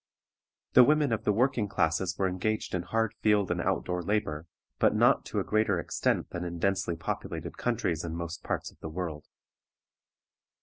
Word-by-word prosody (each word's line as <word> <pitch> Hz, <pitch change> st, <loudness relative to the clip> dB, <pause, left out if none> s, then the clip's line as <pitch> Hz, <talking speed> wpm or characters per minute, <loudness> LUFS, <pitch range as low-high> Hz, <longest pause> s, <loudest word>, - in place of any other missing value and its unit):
The 125 Hz, -, +9 dB
women 150 Hz, -2 st, +3 dB
of 110 Hz, 0 st, -3 dB
the -, -, +4 dB
working 115 Hz, 0 st, +1 dB
classes 90 Hz, 0 st, 0 dB
were 95 Hz, -, +2 dB
engaged 100 Hz, +4 st, -2 dB
in 90 Hz, -, 0 dB
hard 115 Hz, +5 st, -1 dB
field 105 Hz, -4 st, +3 dB
and 90 Hz, -1 st, 0 dB
out 95 Hz, -1 st, 0 dB
door 90 Hz, 0 st, -2 dB
labor, 85 Hz, -5 st, -1 dB, 0.3 s
but -, -, +4 dB
not -, -, +4 dB
to -, -, -2 dB
a -, -, 0 dB
greater 105 Hz, -4 st, +1 dB
extent -, -, -1 dB
than 85 Hz, -, -4 dB
in 85 Hz, -1 st, -4 dB
densely 95 Hz, -1 st, 0 dB
populated 80 Hz, 0 st, -5 dB
countries 110 Hz, -9 st, -1 dB
in 85 Hz, -1 st, -4 dB
most 85 Hz, 0 st, -5 dB
parts -, -, -3 dB
of -, -, -26 dB
the 80 Hz, -, -6 dB
world. 80 Hz, -3 st, -5 dB
95 Hz, 180 wpm, -29 LUFS, 85-110 Hz, 0.3 s, The